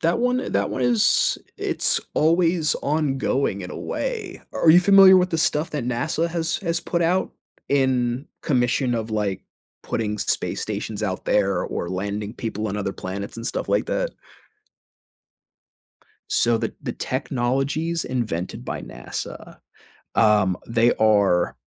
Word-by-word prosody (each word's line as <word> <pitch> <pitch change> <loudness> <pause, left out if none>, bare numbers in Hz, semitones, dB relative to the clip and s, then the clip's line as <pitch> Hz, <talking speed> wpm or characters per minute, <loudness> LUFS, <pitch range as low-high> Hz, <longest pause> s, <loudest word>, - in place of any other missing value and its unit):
that 170 +6 +2
one 250 +1 0
that 100 0 +1
one 130 - -2
is 120 -3 +3 0.2
it's - - +1
always 165 0 +3
ongoing 140 -7 0
in 90 - -7
a - - -7
way. 435 -7 -4
Are 160 - +4
you 175 - +8
familiar 195 0 +8
with 180 0 +2
the 165 - 0
stuff 155 0 +1
that 145 -5 -3
NASA 155 +7 -1
has 170 +1 -1
has 170 -2 -1
put 170 0 -1
out 180 +3 +1 0.4
in 130 -1 +1 0.2
commission 125 -1 +1
of, 110 -1 -3
like, 100 -3 -1 0.4
putting 105 -1 -2
space - - -1
stations 110 -1 -4
out 95 -3 -3
there 100 -3 +1
or 85 - -4
landing 100 +4 -4
people 110 -2 -4
on 100 - -3
other 100 -1 -2
planets 100 +4 -6
and 115 - -5
stuff - - -3
like - - +1
that? - - -1 2.2
So, 120 -1 +3
the - - -2
the - - -3
technologies 135 +7 -1
invented 110 -9 -3
by - - -5
NASA, - - -7 0.6
um, 105 -4 +3
they 115 +1 +3
are 100 -5 +3
125 Hz, 145 wpm, -23 LUFS, 105-165 Hz, 2.2 s, you